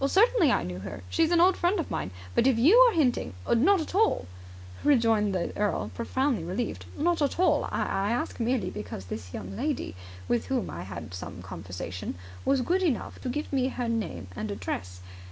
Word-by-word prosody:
"Certainly 390 - +4
I - - +2
knew 90 0 -5
her. 100 0 -7
She - - +1
is 320 - +4
an 345 - +4
old 365 +2 +6
friend 360 +3 +1
of 330 - -3
mine. - - -2 0.2
But 240 - +3
if 260 -4 +4
you 295 - +6
are - - -2
hinting.. 255 - +1
." - - -14
"Not 330 +11 +4
at 315 - -6
all," 430 - +2 0.6
rejoined 225 -7 +3
the 175 - -2
earl, 205 0 -1
profoundly 250 - 0
relieved. 190 +8 -3
"Not 335 +2 +1
at 285 - +1
all. 370 - +3
I 195 +1 0
ask 240 - -2
merely 240 +1 0
because 105 -2 -6
this 90 0 -7
young 95 -1 -6
lady, 85 - -2 0.3
with 115 -4 0
whom 85 -2 -1
I 85 +3 -6
had 85 -3 -7
some 90 0 -7
conversation, 90 0 -6 0.3
was 275 -2 +3
good 360 +9 +1
enough 310 -11 -1
to 255 - -3
give 295 +3 -3
me 260 -2 +2
her 250 -2 -3
name 225 - -2
and 215 - -4
address. 90 - -5
230 Hz, 200 wpm, -28 LUFS, -, 0.6 s, old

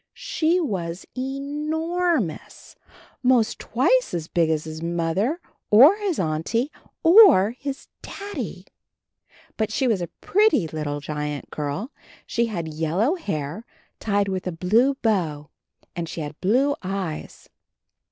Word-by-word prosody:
She 335 +2 0
was 185 - -3
e 265 +2 -3
nor 320 +4 0
mous 165 -8 -7 0.2
— - - -23
most 245 -3 +2
twice - - +1
as 165 -2 -4
big 170 -2 +1
as 155 -1 0
his 160 0 -7
Mother 170 - -1 0.3
or 265 - +8
his 405 -6 -2
Auntie 185 - -1 0.3
or 335 - +7
his 270 +2 -6
Daddy! 405 0 -6 0.9
But 220 -1 -1
she 260 +4 +1
was 215 -6 +1
a 175 - -3
pretty 415 - +3
little 150 -2 -4
giant 150 -1 -5
girl; 150 - -4 0.3
she 235 0 0
had 175 -7 -4
yellow 165 - 0
hair 165 - -4 0.4
tied 205 -2 0
with 190 -1 -3
a - - -1
blue 220 +11 +2
bow, 160 -10 0 0.4
and 170 -2 -4
she 165 - -5
had 150 0 -7
blue 260 +9 +2
eyes. 190 -4 -5
205 Hz, 135 wpm, -23 LUFS, -, 0.9 s, or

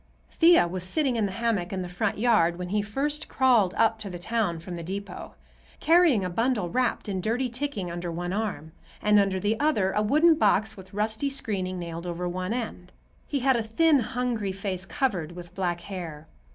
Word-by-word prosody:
Thea 335 - +5
was 180 +1 -4
sitting 265 - +1
in 220 -3 +1
the - - -5
hammock 205 -4 -1
in 190 -2 -3
the - - -5
front 200 +4 -2
yard 210 -7 +3
when 180 0 -5
he 210 +2 +1
first 290 +9 -3
crawled 240 -8 +3
up 225 0 +2
to 210 -2 -6
the 180 - -6
town 205 -2 -1
from 175 +2 -7
the 170 - -6
depot, 195 +4 -7 0.4
carrying 325 - +4
a - - -2
bundle 225 -3 0
wrapped 250 -3 0
in 190 -2 -2
dirty 240 +6 0
ticking 240 -8 -3
under 175 0 -4
one 175 +2 -3
arm, 205 -7 -3 0.3
and 210 0 +4
under 195 -1 +1
the 210 +4 0
other 215 -11 +2
a 210 - +1
wooden 305 +10 +5
box 220 -5 +2
with 185 -1 -13
rusty 220 +6 -1
screening 195 -9 -2
nailed 170 0 -6
over 175 +1 -3
one 185 +2 -3
end. 220 -7 -4 0.4
He 280 -3 -2
had 265 0 +3
a 235 - +1
thin, 285 +7 +3
hungry 240 -4 -2
face 195 -1 -4
covered 180 - -1
with 175 -1 -10
black 175 -2 -2
hair. 165 -5 -7
205 Hz, 200 wpm, -26 LUFS, 180-240 Hz, 0.4 s, Thea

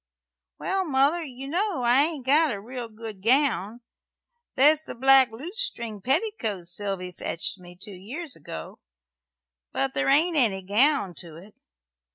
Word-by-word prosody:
"Well, 385 0 -1
Mother, 290 +2 +2
you 270 -2 -8
know 355 -1 -1
I 245 +3 +5
ain't 305 -6 -4
got 300 +2 +4
a 205 - -4
real 240 +2 -7
good 215 -3 -9
gown. 240 -2 +1 0.7
There's 300 +3 +5
the - - -9
black 265 +1 +6
lutestring 235 - -3
petticoat 260 - -1
Sylvy 185 0 -4
fetched 170 +2 -3
me 175 0 -13
two 205 - -8
years 255 - -7
ago; 80 - -9 0.9
but 135 0 -1
there 135 -1 0
ain't 320 +5 +3
any 200 -8 +2
gown 210 +1 +2
to 165 -3 -9
it. 195 +6 -14
245 Hz, 145 wpm, -25 LUFS, 195-295 Hz, 0.9 s, black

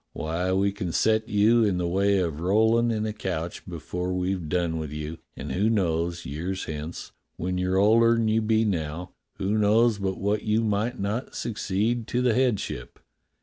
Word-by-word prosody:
Why, 85 +4 -2
we 100 +1 +2
can 95 -3 -4
set 110 0 +2
you 110 +3 +4
in 100 -4 +1
the 90 -1 -1
way 100 +3 +2
of 85 -5 -1
rollin' 110 +6 +3
in 110 -1 -1
a 110 - -2
coach 90 -5 -4
before 90 +2 -4
we've 90 -2 -2
done 85 -2 0
with 75 -2 -5
you, 75 +2 -5 0.2
and - - -5
who 105 +4 +1
knows, 85 -4 0
years 85 +8 -4
hence, 80 +1 -6 0.3
when 90 +1 -2
you're 90 +1 +1
older 115 +4 +5
than 115 -1 +1
you 110 +1 +2
be 110 0 +2
now, 85 -3 -3 0.3
who 105 +3 0
knows 110 +1 +3
but 95 -1 -2
what 100 +2 0
you 110 +1 +1
might 110 +4 -1
not 105 +6 -3
succeed 110 +2 -1
to 125 +1 0
the 125 -2 +3
headship. 120 - -1
100 Hz, 185 wpm, -26 LUFS, 85-110 Hz, 0.3 s, older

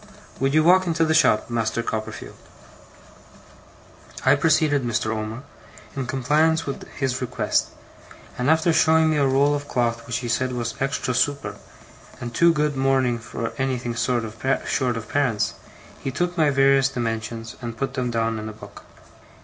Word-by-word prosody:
Would 135 +2 +1
you 155 - +5
walk 185 +2 +5
into 165 -1 +2
the 160 - +1
shop, 110 -8 +3
Master 115 0 -1
Copperfield?' 110 -1 -5 1.9
I 135 - +6
preceded 145 -1 +2
Mr. 110 -2 -1
Omer, 110 +3 -5 0.5
in 135 -2 -3
compliance 150 +6 +2
with 140 - -6
his 135 -2 -2
request; 125 - 0 0.7
and 125 +3 0
after 160 +1 +3
showing 160 0 +4
me 155 - +1
a 140 -2 +3
roll 140 +2 +3
of 145 0 -3
cloth 115 -3 -1
which 115 - -1
he - - -2
said 125 +2 0
was 120 -1 -3
extra 135 -1 -1
super, 140 +3 0 0.6
and 120 -1 -6
too 170 +5 +5
good 150 -2 0
mourning 135 -3 +1
for 115 0 -5
anything 125 -2 -1
short 120 0 0
of 110 0 -10 0.7
parents, 125 -7 0 0.5
he - - -4
took 175 +6 -2
my 155 -4 +3
various 135 -1 +4
dimensions, 115 -2 -4
and 115 -2 -6
put 135 -1 -3
them 130 -3 -2
down 115 -1 -1
in 110 0 -5
a - - -8
book. 110 - -13
130 Hz, 160 wpm, -23 LUFS, 115-145 Hz, 1.9 s, I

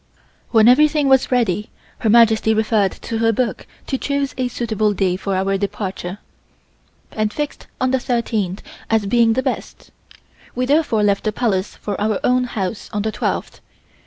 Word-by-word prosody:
When 225 -1 +5
everything 295 +2 +4
was 265 -1 +3
ready 210 -5 +1 0.3
Her 220 - 0
Majesty 220 -1 +5
referred 215 -2 +2
to 225 - -3
her 225 0 +3
book 235 +2 -2 0.2
to 265 - -2
choose 280 -1 -1
a 255 -1 -1
suitable 220 -3 -1
day 190 -2 0
for 195 +1 -3
our 195 +1 0
departure, 195 -2 -4 0.9
and 215 -1 -1
fixed 295 +5 -5
on 255 0 +1
the 265 - +2
thirteenth 225 -6 -2 0.3
as 225 -2 +2
being 230 +2 +3
the 260 +3 -1
best. - - -5 0.6
We 255 - 0
therefore 275 -6 +2
left 200 -1 +2
the 215 - +1
Palace 205 -4 -1
for 205 -1 -5
our 215 -1 0
own 250 0 +2
house 205 -3 -4
on 210 -1 -2
the 220 - -1
twelfth. 210 - -3
220 Hz, 165 wpm, -20 LUFS, 205-250 Hz, 0.9 s, When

